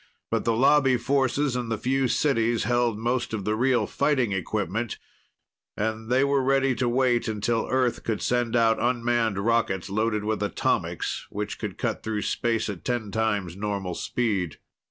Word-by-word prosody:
But - - 0
the 115 - +2
Lobby 135 0 +4
forces 135 +2 +1
and 120 -2 -2
the 110 - 0
few 135 +2 +1
cities 120 -4 +1
held 120 -2 +1
most 120 +1 -1
of 100 - -5
the 105 - +1
real 125 +2 +2
fighting 140 -6 +1
equipment 105 +4 -2 0.8
and 110 +1 -2
they 130 +2 +3
were 140 -1 +2
ready 135 0 +2
to 125 0 0
wait 120 -1 +2
until 110 +1 -1
Earth 130 -2 +1
could 110 -2 -1
send 120 -1 0
out 115 -1 +3
unmanned 120 -3 +1
rockets, 100 -3 0
loaded 110 0 0
with 110 -1 -1
atomics, 105 - -1
which 105 +1 -4
could - - -5
cut - - -2
through 110 -2 -2
space 115 -2 0
at 100 -5 -6
ten 120 -4 -2
times 105 -6 -1
normal 100 -2 -3
speed. 100 -7 -1
115 Hz, 165 wpm, -26 LUFS, 105-125 Hz, 0.8 s, Lobby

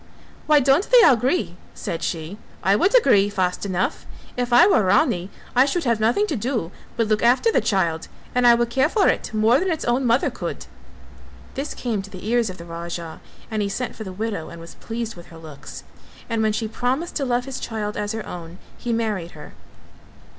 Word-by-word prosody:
"Why 300 -1 +6
don't 275 +8 +2
they - - +7
agree," 235 - +1 0.2
said 165 - -4
she, 165 +5 -4 0.2
"I 195 +1 +4
would 385 - +4
agree 205 - +4
fast 190 -1 -1
enough. 185 -1 -2 0.3
If 245 0 -2
I 245 +9 +7
were 390 - +4
Rani 185 0 +2 0.3
I 255 +2 +6
should 330 +5 -1
have 235 -3 +1
nothing 235 - +2
to 325 - -2
do 230 -6 -2 0.3
but 230 - +2
look 215 0 +1
after 255 - +4
the - - +2
child 170 -6 0 0.3
and 250 0 +3
I 235 - +8
would 235 0 0
care 265 +5 +2
for 400 +2 +2
it - - -1
more 220 +4 +3
than 380 - -1
its 325 -3 -2
own 245 +3 +1
mother 235 +3 +2
could." - - -6 0.9
This 275 +3 -4
came 225 -5 -2
to 195 - -11
the 185 0 -10
ears 235 -1 +2
of 185 - -8
the 170 - -10
Raja 170 -1 -7 0.3
and 215 -1 -1
he 200 - -1
sent 250 +5 -4
for 220 - -7
the 190 - -7
widow 200 -3 -4
and 170 - -10
was 165 0 -11
pleased 230 0 -5
with 175 -1 -13
her 165 - -13
looks, 155 -3 -10 0.4
and 230 -2 -1
when 220 0 +2
she 220 +1 -2
promised 255 +9 -2
to 285 - -1
love 245 -1 0
his 270 -1 -6
child 210 -2 -4
as 210 +1 -3
her 220 -1 -5
own, 170 0 -8 0.2
he 240 - -3
married 215 -7 -2
her. 150 - -11
220 Hz, 210 wpm, -22 LUFS, 185-250 Hz, 0.9 s, I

